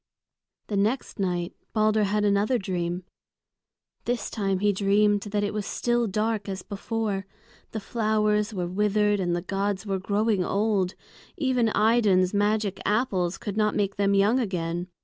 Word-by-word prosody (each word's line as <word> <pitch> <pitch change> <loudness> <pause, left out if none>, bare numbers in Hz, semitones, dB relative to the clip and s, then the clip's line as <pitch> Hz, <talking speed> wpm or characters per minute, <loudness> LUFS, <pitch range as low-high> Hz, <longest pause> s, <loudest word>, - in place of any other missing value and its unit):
The 205 - -2
next 220 +4 -1
night 180 -1 -1 0.2
Balder 215 -1 +3
had 210 +1 +1
another 205 +5 +2
dream. 180 -3 -3 1.0
This 245 0 -2
time 195 -3 0
he 205 +2 +2
dreamed 205 +1 +3
that 205 0 -2
it 205 - -1
was 210 -1 -2
still 240 -1 0
dark 215 +1 -1
as 190 -1 -4
before; 200 -1 -3 0.4
the 220 - -4
flowers 215 0 +1
were 185 -4 -2
withered 210 +2 +1
and 175 -2 0
the 175 - -3
gods 195 +2 -2
were 195 -2 -1
growing 205 0 +1
old; 200 -2 0 0.4
even 255 -7 +2
Idun's 210 -5 +3
magic 205 -1 +1
apples 195 -5 0
could 205 -1 -5
not 210 -1 +2
make 200 -1 -1
them 200 0 +2
young 205 +6 +4
again. 175 -5 -2
205 Hz, 150 wpm, -26 LUFS, 195-215 Hz, 1.0 s, young